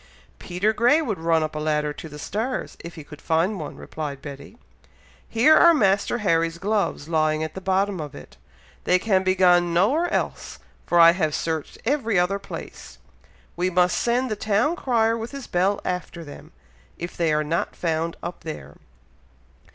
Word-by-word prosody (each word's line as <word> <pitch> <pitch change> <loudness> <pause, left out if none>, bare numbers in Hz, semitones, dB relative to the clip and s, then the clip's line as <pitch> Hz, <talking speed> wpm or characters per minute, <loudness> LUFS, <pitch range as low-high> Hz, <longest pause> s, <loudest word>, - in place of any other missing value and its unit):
"Peter 190 +5 0
Grey 245 +7 +4
would 225 - -2
run 165 -1 +2
up 155 - -4
a - - -2
ladder 150 -1 0
to 160 - -9
the 150 - -10
stars, 225 - -3
if 170 - -9
he 155 - -9
could 150 0 -13
find 175 +5 0
one," 150 - -6
replied 150 -3 -6
Betty. 140 +8 -10 0.7
"Here 250 +8 +5
are 340 -1 +7
Master 200 -2 +2
Harry's 165 -1 +1
gloves 200 -5 -1
lying 155 -1 +1
at 160 -1 -5
the 190 - -7
bottom 190 -1 0
of 145 -1 -8
it. - - -12 0.5
They 180 - +4
can 190 -1 +1
be 185 0 +1
gone 175 -2 +4
nowhere 275 - +2
else, - - -3 0.3
for 175 - +3
I 165 0 +9
have 160 -4 -1
searched 160 -2 -3
every 235 -6 +1
other 180 +3 +1
place. - - -9 0.6
We 180 +2 0
must 180 0 +2
send 245 +1 0
the - - 0
town 215 +10 +1
crier 230 -7 +1
with 230 +1 -5
his 275 -3 -7
bell 190 +3 +1
after 180 -1 -4
them, 145 -2 -12 0.5
if 170 +1 -6
they 165 -2 +1
are 150 0 +1
not 160 +3 -2
found 165 0 -2
up 175 +1 -5
there!" 75 - -8
180 Hz, 180 wpm, -23 LUFS, 160-215 Hz, 0.7 s, I